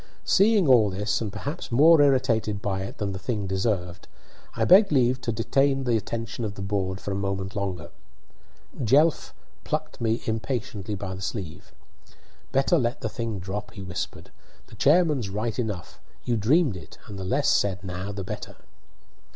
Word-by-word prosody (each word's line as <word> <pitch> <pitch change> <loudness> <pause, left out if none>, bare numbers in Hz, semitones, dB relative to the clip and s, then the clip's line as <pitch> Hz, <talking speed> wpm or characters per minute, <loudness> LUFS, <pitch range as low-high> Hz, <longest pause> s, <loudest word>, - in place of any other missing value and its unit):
Seeing 200 -3 +4
all 120 -6 +6
this, 100 +2 -1
and 110 -3 -3
perhaps 145 - -6
more 155 +6 +6
irritated 120 -7 +2
by 95 -2 -2
it 95 - -7
than 100 -2 -2
the 95 - -5
thing 105 0 -2
deserved, 95 -2 -2 0.5
I - - +1
begged 195 +1 +7
leave 130 -2 +2
to 115 - -2
detain 135 +5 +1
the 120 -3 +1
attention 115 +2 -3
of 105 -2 -4
the 100 - -6
board 100 -1 -2
for 100 - -5
a - - -1
moment 95 0 -3
longer. 90 -5 -4 0.9
Jelf 145 +8 +3 0.3
plucked 155 -3 -4
me 115 0 0
impatiently 110 -3 -3
by 95 -1 -5
the 95 - -8
sleeve. 95 -5 -6 0.8
"Better 135 +1 +3
let 120 +1 -1
the - - -2
thing 115 -4 -4
drop," 100 +3 -6
he 100 - -8
whispered. 90 -1 -6 0.3
"The - - -14
chairman's 150 - +3
right 110 +4 -3
enough; 105 -7 -4 0.2
you 120 - 0
dreamed 130 - +3
it, 80 -4 -11
and 100 -2 -8
the - - -4
less 130 +9 +1
said 95 -2 +1
now 95 +1 -5
the 100 -1 -5
better." - - -7
105 Hz, 170 wpm, -25 LUFS, 95-130 Hz, 0.9 s, begged